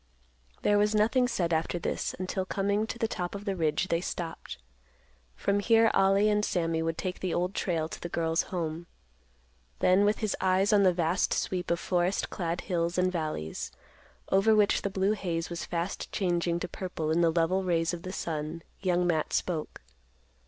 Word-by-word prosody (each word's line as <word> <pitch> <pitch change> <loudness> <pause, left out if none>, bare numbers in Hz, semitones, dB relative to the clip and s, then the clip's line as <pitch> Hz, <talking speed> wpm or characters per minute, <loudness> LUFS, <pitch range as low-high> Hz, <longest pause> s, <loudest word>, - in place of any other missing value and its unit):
There 205 0 +4
was 210 +1 +2
nothing 235 +4 +3
said 175 -8 0
after 160 +2 0
this, 170 - -2
until, 185 +1 -2
coming 200 +3 0
to - - -5
the 230 -1 0
top 180 -2 -4
of 200 +1 -7
the 195 -2 -1
ridge, 160 +1 0
they 170 0 +1
stopped. 170 -2 -5 0.8
From 200 - +1
here 225 +1 +4
Ollie 195 +2 +4
and 210 0 +2
Sammy 165 -4 0
would 165 0 -2
take 185 -1 -3
the 185 -2 -2
Old 180 +2 0
Trail 165 -6 -1
to - - -9
the 175 - -5
girl's 165 -1 +1
home. 170 -2 -4 0.9
Then, 185 - +4
with 210 +1 +3
his 215 -3 -1
eyes 190 +2 +3
on 205 - +6
the 190 -2 +5
vast 175 +1 +1
sweep 180 -2 -2
of 170 - +1
forest 180 +1 0
clad 170 -1 -2
hills 170 -1 -1
and 185 0 +2
valleys, 155 - -3 0.6
over 205 +3 +5
which 210 -1 +3
the 200 - -1
blue 195 +1 +1
haze 175 -5 -2
was 170 - -4
fast 175 +2 -3
changing 175 -2 0
to 180 - -2
purple 175 -4 -4
in 165 +2 +3
the 170 - +4
level 170 +3 +2
rays 170 -2 +1
of 170 - -5
the 185 - -6
sun, 160 -2 -4 0.2
Young 180 -2 +1
Matt 160 -3 0
spoke. 160 -4 -2
180 Hz, 190 wpm, -29 LUFS, 165-195 Hz, 0.9 s, on